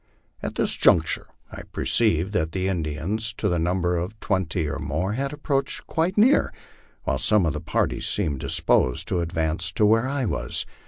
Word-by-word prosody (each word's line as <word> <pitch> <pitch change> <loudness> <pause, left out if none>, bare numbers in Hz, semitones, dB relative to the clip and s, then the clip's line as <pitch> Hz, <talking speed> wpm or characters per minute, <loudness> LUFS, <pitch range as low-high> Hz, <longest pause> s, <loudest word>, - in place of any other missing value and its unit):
At - - -4
this - - +1
juncture 80 -2 +3 0.2
I - - -7
perceived 100 -4 +1
that 80 -4 0
the 95 0 -1
Indians, 95 +6 -2
to 105 - -1
the 85 -3 +1
number 90 +1 0
of 90 +6 -4
twenty 90 -5 -1
or - - -3
more, 80 +8 -2
had 135 +4 -2
approached 145 -2 -2
quite 170 +5 -1
near, 245 +7 +4 0.5
while 65 - -1
some 105 -4 +3
of 80 - 0
the 75 - -4
party - - -1
seemed 80 -10 0
disposed 65 -1 +1
to 90 - 0
advance 85 0 -1
to 105 - +3
where 115 +4 +3
I 140 -1 -1
was. - - -2
90 Hz, 175 wpm, -24 LUFS, 80-110 Hz, 0.5 s, near